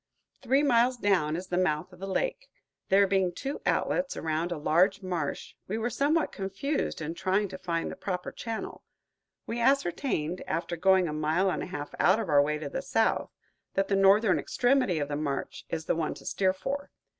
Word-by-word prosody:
Three 270 +3 +2
miles 250 -2 +3
down 180 -8 +2
is 180 +2 -4
the 180 - +1
mouth 180 0 0
of 180 - -15
the 195 - -5
lake. - - -2 0.4
There 200 +1 +6
being 190 -2 +1
two 270 +11 -5
outlets 275 0 0
around 160 +2 -1
a 175 - -2
large 185 +7 +2
marsh, 175 -5 -3
we 210 - -2
were 235 +2 -1
somewhat 295 +6 +1
confused 195 - -3
in 155 +2 -3
trying 190 +3 0
to 185 0 -8
find 165 -2 -2
the - - -7
proper 180 -3 -4
channel. 225 -2 -6 0.6
We 235 - -3
ascertained, 205 - +1
after 170 +2 -2
going 190 +1 +4
a 150 - -3
mile 160 +5 +1
and - - -2
a - - -4
half 145 -5 -6
out 190 +5 +4
of 215 -6 -3
our 145 -1 +6
way 150 +1 0
to 150 -2 -5
the - - -3
south, - - +1 0.5
that 195 0 +1
the 200 - +2
northern 195 +1 +5
extremity 245 -8 +2
of 145 -2 -1
the 145 - -3
marsh 145 -2 -3
is 160 -1 -3
the - - +1
one 160 -1 -2
to - - -13
steer 190 -1 +1
for. 275 +9 -4
190 Hz, 200 wpm, -28 LUFS, 165-225 Hz, 0.6 s, There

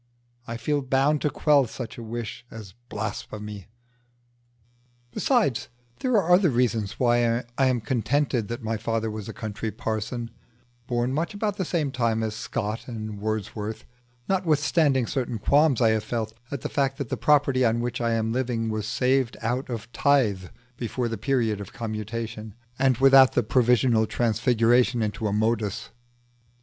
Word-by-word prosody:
I 115 - -4
feel 145 +5 0
bound 135 +3 +2
to 150 - +1
quell 145 -2 +3
such 115 0 -7
a - - -8
wish 115 0 -6
as 105 -4 -10 0.2
blasphemy. 105 -1 -6 1.4
Besides, 215 - +1 0.3
there 255 -1 0
are 180 -4 +1
other 180 -1 +5
reasons 115 -5 0
why 120 -1 +2
I 135 0 +3
am 125 -2 +1
contented 125 +1 0
that 120 +2 -5
my 110 0 -1
father 115 0 -2
was 105 0 -6
a - - -3
country 110 0 -5
parson, 115 +1 -4 0.6
born 120 +1 0
much 165 +7 -2
about 205 -1 -2
the 185 - -1
same 155 -5 -1
time 115 -3 0
as 110 -1 -2
Scott 110 0 -4
and 110 -4 -6
Wordsworth; 110 0 -4 0.4
notwithstanding 150 -7 +2
certain 125 -2 -2
qualms 140 +4 +3
I 115 - +5
have 110 -1 +1
felt 110 -2 -3 0.2
at 140 -4 -5
the - - -2
fact 135 -1 0
that 140 -6 -4
the - - -1
property 140 -3 +3
on 115 -1 +2
which 120 +1 -3
I 115 -1 +1
am 110 0 0
living 120 -3 -1
was 110 -1 -3
saved 130 +1 +1
out 125 +4 -1
of 115 -1 -6
tithe 115 -12 +2 0.3
before 120 +1 -2
the 115 - -3
period 115 -4 0
of 100 - -9
commutation, 110 -1 -5 0.2
and 130 -2 +3
without 135 0 +7
the 120 - +2
provisional 120 -1 +3
transfiguration 120 +1 +2
into 105 +1 -2
a - - -1
modus. 110 -1 -1
120 Hz, 160 wpm, -25 LUFS, 110-135 Hz, 1.4 s, without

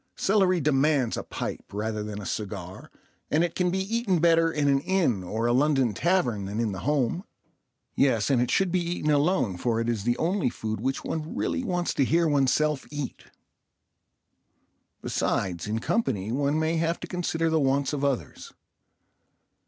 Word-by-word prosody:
Celery 190 -3 +2
demands 140 -3 +2
a - - -3
pipe - - -5
rather 105 +1 -3
than 105 0 -5
a 100 - -7
cigar, 95 -2 -5 0.4
and 155 +3 +3
it 175 - -1
can 180 -1 +1
be 185 - -1
eaten 195 0 0
better 165 0 +4
in 150 -2 0
an 140 -1 +4
inn 165 - +1
or 110 +6 -2
a 120 - +2
London 135 -3 +2
tavern 125 - +1
than 100 +3 -4
in 115 -3 0
the 95 - -5
home. 145 - 0 0.7
Yes, 130 -2 +2
and 125 -3 +3
it 125 - 0
should 190 -2 +2
be 180 - +2
eaten 170 -3 -1
alone, 145 - +2
for 115 +4 0
it 115 - -1
is 115 -4 -1
the 120 +2 +1
only 170 -4 +1
food 110 -2 -4
which 135 +2 -2
one 160 0 -4
really 260 - -1
wants 180 -6 -1
to 140 - +2
hear 165 +5 +2
oneself 145 0 +1
eat. 145 -2 -6 1.8
Besides, 90 -2 -1
in 110 +1 -1
company 115 - -1
one 140 +4 +1
may 160 +1 +1
have 165 +1 0
to 175 - -6
consider 165 -2 -1
the 160 - +3
wants 135 0 +1
of 140 -1 -2
others. 140 -3 -2
140 Hz, 175 wpm, -26 LUFS, 115-170 Hz, 1.8 s, better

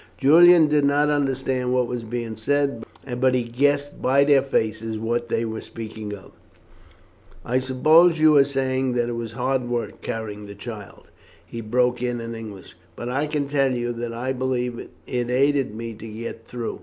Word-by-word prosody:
Julian 165 +6 +7
did 150 -1 +2
not 145 +1 +3
understand 135 -3 0
what 125 -1 +2
was 120 0 -4
being 115 0 -4
said, 140 +1 0 0.4
but 130 0 +3
he 125 - +1
guessed 145 +4 0
by 135 +2 +4
their 140 -1 +5
faces 110 -4 -1
what 120 +2 -2
they 115 0 0
were 110 0 -5
speaking 110 -2 -8
of. 95 - -15 1.1
"I 125 +2 +1
suppose 155 +6 +4
you 155 -1 +6
are 140 - +7
saying 130 -2 -1
that 120 -1 0
it 120 - -3
was 115 -1 -5
hard 125 0 -1
work 120 -1 -3
carrying 105 -2 -5
the 100 - -10
child," 105 -1 -10 0.3
he 115 - -7
broke 125 +2 +1
in 120 -1 -2
in 115 0 -6
English; 110 -5 -9 0.2
"but 120 - -5
I 140 +4 -1
can 150 -2 -2
tell 135 -2 +1
you 120 0 -2
that 120 0 -5
I 125 +3 -3
believe 125 -2 -2
it - - -9 0.2
aided 125 0 +1
me 115 0 -6
to 115 +1 -10
get 115 +1 -7
through. 120 -2 -5
125 Hz, 180 wpm, -23 LUFS, 115-135 Hz, 1.1 s, Julian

